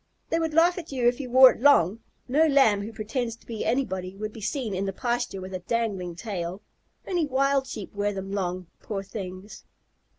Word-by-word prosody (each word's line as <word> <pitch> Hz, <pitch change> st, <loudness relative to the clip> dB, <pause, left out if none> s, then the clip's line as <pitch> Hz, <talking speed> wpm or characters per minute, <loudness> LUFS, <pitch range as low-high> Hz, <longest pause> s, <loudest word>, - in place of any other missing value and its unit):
"They 330 Hz, -, +2 dB
would 320 Hz, -2 st, -2 dB
laugh 345 Hz, +2 st, +4 dB
at 325 Hz, -, -10 dB
you 250 Hz, -3 st, +1 dB
if 245 Hz, +2 st, +2 dB
you 260 Hz, -3 st, -5 dB
wore 260 Hz, +1 st, +9 dB
it -, -, -9 dB
long. 230 Hz, -, +5 dB, 0.3 s
No 300 Hz, +5 st, +4 dB
Lamb 265 Hz, -9 st, +4 dB
who 210 Hz, +3 st, -6 dB
pretends 225 Hz, +2 st, -3 dB
to -, -, -25 dB
be 225 Hz, -2 st, -4 dB
anybody 190 Hz, -8 st, -1 dB
would 215 Hz, +1 st, -5 dB
be 225 Hz, -, -10 dB
seen 220 Hz, 0 st, -2 dB
in 190 Hz, +1 st, -1 dB
the 195 Hz, -, -2 dB
pasture 240 Hz, -2 st, -2 dB
with 185 Hz, +1 st, -8 dB
a 185 Hz, -, -3 dB
dangling 195 Hz, -4 st, -2 dB
tail. 190 Hz, -1 st, -5 dB, 0.4 s
Only 350 Hz, -5 st, 0 dB
wild 275 Hz, 0 st, +1 dB
Sheep 215 Hz, -6 st, -7 dB
wear 205 Hz, 0 st, 0 dB
them 195 Hz, -1 st, -6 dB
long, 185 Hz, -2 st, -2 dB, 0.2 s
poor 195 Hz, -2 st, -4 dB
things!" 195 Hz, 0 st, -8 dB
220 Hz, 205 wpm, -26 LUFS, 195-265 Hz, 0.4 s, wore